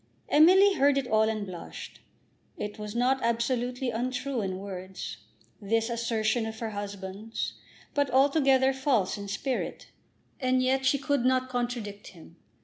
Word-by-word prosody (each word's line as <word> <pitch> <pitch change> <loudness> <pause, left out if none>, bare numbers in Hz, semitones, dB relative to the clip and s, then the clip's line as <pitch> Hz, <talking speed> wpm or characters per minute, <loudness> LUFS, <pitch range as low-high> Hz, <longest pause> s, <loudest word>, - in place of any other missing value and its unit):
Emily 375 +6 +7
heard 280 -4 +3
it 275 - 0
all 220 -1 +3
and 215 -2 -2
blushed. 180 -3 -9 0.6
It 210 +1 -5
was 210 +1 -6
not 255 +2 +2
absolutely 245 +2 0
untrue 255 +2 -2
in 190 -2 -3
words, 190 -1 -7 0.4
this 225 +3 0
assertion 230 -1 0
of 220 0 -6
her 225 -1 -4
husband's, 205 +1 -5 0.4
but 285 -2 +1
altogether 270 0 +4
false 265 -8 +1
in 200 -1 -7
spirit. 245 +6 -3 0.5
And 255 -1 +2
yet 265 +1 +2
she 280 - +4
could 280 -2 0
not 255 0 +2
contradict 240 -5 -3
him. 165 -1 -14
240 Hz, 145 wpm, -28 LUFS, 210-265 Hz, 0.6 s, Emily